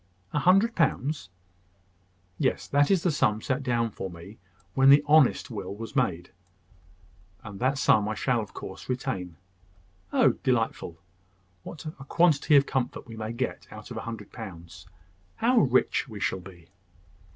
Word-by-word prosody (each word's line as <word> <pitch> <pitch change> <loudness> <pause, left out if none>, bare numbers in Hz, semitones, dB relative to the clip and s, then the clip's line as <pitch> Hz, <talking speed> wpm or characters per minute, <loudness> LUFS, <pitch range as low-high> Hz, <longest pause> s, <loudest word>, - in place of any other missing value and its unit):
"A 150 - +1
hundred 195 - +4
pounds!" 145 - 0 1.1
"Yes; - - 0
that 145 0 +3
is 190 -4 +2
the 180 - +2
sum 110 -7 +1
set 130 +4 -2
down 120 -3 0
for 95 -1 -6
me 90 +5 -12 0.3
when 135 0 +5
the 145 +1 +7
honest 150 -4 +4
will 100 -3 -5
was 115 0 -8
made; 90 0 -1 1.1
and 100 -2 -9
that 130 +2 +1
sum 105 -5 +3
I 110 - -2
shall 125 -1 0
of 105 - -9
course 95 +4 -9
retain." 125 -9 -3 0.8
"Oh, - - +4
delightful! 85 - -1 0.6
What 160 - -10
a 155 -3 -8
quantity 155 -1 +3
of 140 0 +6
comfort 130 -3 -3
we 115 - -10
may 110 0 -5
get 125 +2 -4
out 105 +2 -11
of 120 - -6
a - - -3
hundred 110 -3 -7
pounds! 85 -6 -10 0.5
How 245 +1 +3
rich 130 +2 +2
we 105 -2 -8
shall 95 - -1
be!" 85 -3 -14
120 Hz, 160 wpm, -27 LUFS, 100-140 Hz, 1.1 s, the